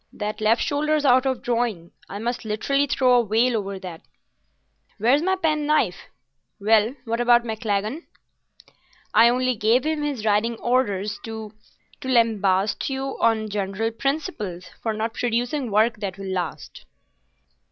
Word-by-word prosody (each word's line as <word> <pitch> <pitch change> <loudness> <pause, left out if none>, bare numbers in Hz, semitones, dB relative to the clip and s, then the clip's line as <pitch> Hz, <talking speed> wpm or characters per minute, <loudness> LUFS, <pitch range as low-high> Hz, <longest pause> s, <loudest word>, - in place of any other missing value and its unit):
That 210 +1 -4
left 220 +2 +3
shoulder's 300 +1 0
out 260 0 +4
of 260 -2 -2
drawing. 230 -8 -1 0.2
I 200 - -6
must 235 +3 -3
literally 275 +7 0
throw 255 -2 +3
a 235 - -1
veil 230 +4 +2
over 200 -2 -3
that. 180 -4 -9 1.0
Where's 245 +7 +3
my 380 +3 +1
pen 305 -5 0
knife? 305 0 +1 0.5
Well, 220 +4 +3
what 230 +1 -1
about 240 0 +5
Maclagan?" 220 - -3 1.1
"I 235 - +7
only 255 +1 +1
gave 230 +5 +2
him 310 -1 -1
his 280 -7 -3
riding 215 +2 +2
orders 210 -5 0
to—to 220 +2 -11
lambast 215 -5 +2
you 270 0 -3
on 220 -1 +2
general 205 +2 -2
principles 225 - -3 0.2
for 225 - -1
not 220 +1 -3
producing 245 +3 -1
work 215 +3 +2
that 200 -3 -5
will 195 -1 -5
last." 175 -3 -5
230 Hz, 140 wpm, -23 LUFS, 210-255 Hz, 1.1 s, I